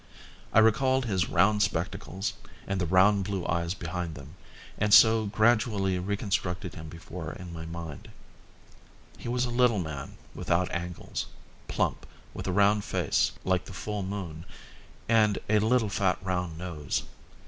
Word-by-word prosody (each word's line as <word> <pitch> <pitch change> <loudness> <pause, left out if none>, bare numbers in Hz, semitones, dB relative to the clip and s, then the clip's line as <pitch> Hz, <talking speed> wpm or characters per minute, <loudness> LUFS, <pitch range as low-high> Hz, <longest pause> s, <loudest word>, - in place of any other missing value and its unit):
I - - +1
recalled 130 +4 +4
his 95 -5 0
round 105 +1 +3
spectacles 95 +1 -2 0.3
and 95 -1 -2
the 90 - 0
round 95 +3 +4
blue 95 -2 -3
eyes 85 +2 -1
behind 85 -2 -4
them, 70 +1 -11 0.5
and 105 0 +1
so 110 -1 +6
gradually 105 -3 +2
reconstructed 95 -1 -2
him 80 -3 -8
before 85 0 -7 0.2
my 80 0 -7
mind. 85 -3 -7 1.1
He - - -5
was 125 +1 +1
a 120 - -3
little 120 -2 +3
man, 75 -6 -5 0.2
without 85 +1 0
angles, 85 0 -4 0.4
plump, - - -1 0.3
with - - -6
a - - +1
round 100 +2 +3
face - - +1
like 95 -1 +1
the - - -9
full 105 +2 -4
moon 95 -4 -5 0.6
and 110 -3 +4
a 105 0 +4
little 110 0 +2
fat 95 -2 +1
round 90 -3 -2
nose. 85 -4 -3
95 Hz, 145 wpm, -28 LUFS, 85-105 Hz, 1.1 s, so